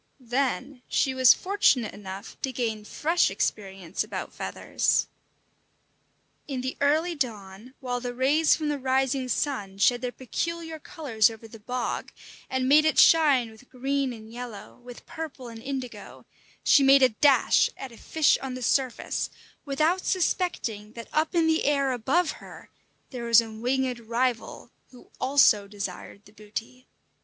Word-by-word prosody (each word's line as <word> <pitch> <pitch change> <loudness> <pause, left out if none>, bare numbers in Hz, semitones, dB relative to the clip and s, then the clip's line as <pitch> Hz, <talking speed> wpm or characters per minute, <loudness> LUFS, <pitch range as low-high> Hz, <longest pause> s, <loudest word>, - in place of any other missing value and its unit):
Then 265 0 -1
she 265 - +1
was 260 -1 +6
fortunate 325 - +1
enough 195 +1 -9
to 265 - -2
gain 225 -4 -3
fresh 330 +9 +1
experience 195 -2 -3
about - - -6
feathers. - - 0 1.4
In 270 -3 -3
the 260 +1 -4
early 310 +5 +2
dawn, 225 -3 -5
while 250 -1 -2
the 245 0 -5
rays 290 +5 +3
from 305 -1 -3
the 290 -1 -2
rising 265 0 0
sun 210 -8 -2
shed 240 +4 +3
their 250 -1 -3
peculiar 325 +6 -4
colours 270 - +1
over 225 0 -11
the 225 0 -13
bog, 245 +3 -4 0.4
and 260 0 -1
made 295 +3 +6
it 315 - +1
shine 280 -8 +5
with 220 +3 -18
green 270 +1 -1
and 220 -1 -11
yellow, 240 -4 -9
with 245 -1 -12
purple 290 -6 -7
and 225 -1 -10
indigo, 260 -1 -7 0.4
she - - +5
made 270 0 +6
a 260 - +6
dash 270 +5 +4
at 265 -2 -8
a 230 - -14
fish 315 -2 +2
on 265 -2 -5
the 255 - -6
surface, 260 +1 0 0.4
without 310 +6 +1
suspecting 245 - -1
that 230 -1 -9
up 310 +3 0
in 335 -1 +3
the 320 0 +2
air 280 -2 +2
above 280 +8 +1
her - - -13 0.4
there 245 -3 -6
was 230 -1 +7
a 225 -1 -3
winged 250 +2 -1
rival, 235 +1 -2 0.2
who 250 - -17
also 255 -7 +4
desired 200 0 -7
the 205 - -17
booty. 220 +4 -8
255 Hz, 155 wpm, -26 LUFS, 225-280 Hz, 1.4 s, was